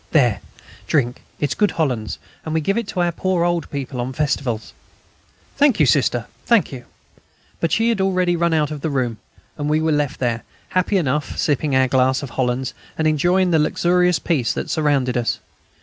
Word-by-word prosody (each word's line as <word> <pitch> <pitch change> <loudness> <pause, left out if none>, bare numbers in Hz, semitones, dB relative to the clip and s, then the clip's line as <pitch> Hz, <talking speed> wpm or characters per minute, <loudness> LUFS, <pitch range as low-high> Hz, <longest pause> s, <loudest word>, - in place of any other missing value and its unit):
"There, 120 - +3 0.5
drink. 125 -5 0 0.2
It's 145 -2 0
good 210 -1 +2
Hollands,... 125 -9 -1 0.3
and 160 0 -3
we - - +3
give 195 +6 0
it 230 -2 -2
to 185 -3 -2
our 175 0 +2
poor 180 0 0
old 175 -2 -1
people 135 -3 -4
on 125 +2 -4
festivals." 130 -6 -2 0.8
"Thank 280 -7 +4
you. 150 - +6
Sister, 125 -3 +2 0.2
thank 230 -7 +3
you." 125 -3 -8 0.7
But 165 - 0
she 225 +1 +2
had 225 -4 +1
already 185 -2 +2
run 170 0 +1
out 155 -2 +1
of 150 -2 -5
the 160 - -1
room, 125 -5 -1 0.4
and 145 0 -1
we 155 +1 +3
were 160 0 +1
left 145 -2 0
there, 120 -2 0 0.3
happy 185 +2 +1
enough, 150 -3 -1
sipping 145 -1 +1
our 130 0 +4
glass 130 +1 +2
of 135 - -6
Hollands, 130 0 -1 0.2
and 160 - +1
enjoying 175 +4 +2
the 160 - +4
luxurious 180 +3 +2
peace 135 -9 0
that - - -4
surrounded 145 -5 +1
us. 120 -1 0
150 Hz, 190 wpm, -21 LUFS, 130-175 Hz, 0.8 s, you